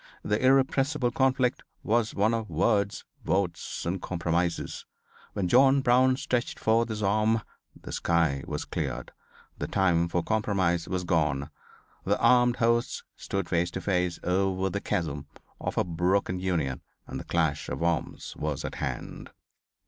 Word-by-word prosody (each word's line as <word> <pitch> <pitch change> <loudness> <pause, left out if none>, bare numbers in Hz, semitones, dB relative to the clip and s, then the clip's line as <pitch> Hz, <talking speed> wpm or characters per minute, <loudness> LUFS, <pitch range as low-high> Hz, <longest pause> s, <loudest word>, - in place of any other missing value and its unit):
The 105 +4 0
irrepressible 135 0 +3
conflict 130 -1 +1 0.2
was 115 0 +1
one 105 +3 +2
of 115 -2 -2
words, 100 -3 +1 0.2
votes 95 -3 -1
and 90 +2 -2
compromises. 85 -1 -2 0.5
When 95 -3 -1
John 135 +6 +5
Brown 130 +1 +4
stretched 125 -2 -1
forth 115 +1 +2
his 105 -1 -3
arm 110 +2 +2 0.4
the - - -9
sky 80 -5 +1
was - - -3
cleared, - - -4 0.5
the - - -2
time 85 -3 +2
for 85 0 -1
compromise 95 -5 0
was 90 -1 -2
gone, 75 -4 0 0.5
the - - +1
armed 125 -1 +5
hosts 115 0 +1
stood 100 -2 -3
face 85 0 +1
to 95 - -5
face 90 -3 0
over 95 +1 +1
the 100 - -2
chasm 75 -4 -2 0.3
of - - -4
a - - +4
broken 90 +2 0
Union 80 -8 -1 0.2
and - - -6
the - - -7
clash 80 -4 0
of - - -3
arms 85 -5 -2
was 75 -2 -3
at - - -4
hand." - - -5
95 Hz, 150 wpm, -28 LUFS, 85-115 Hz, 0.5 s, John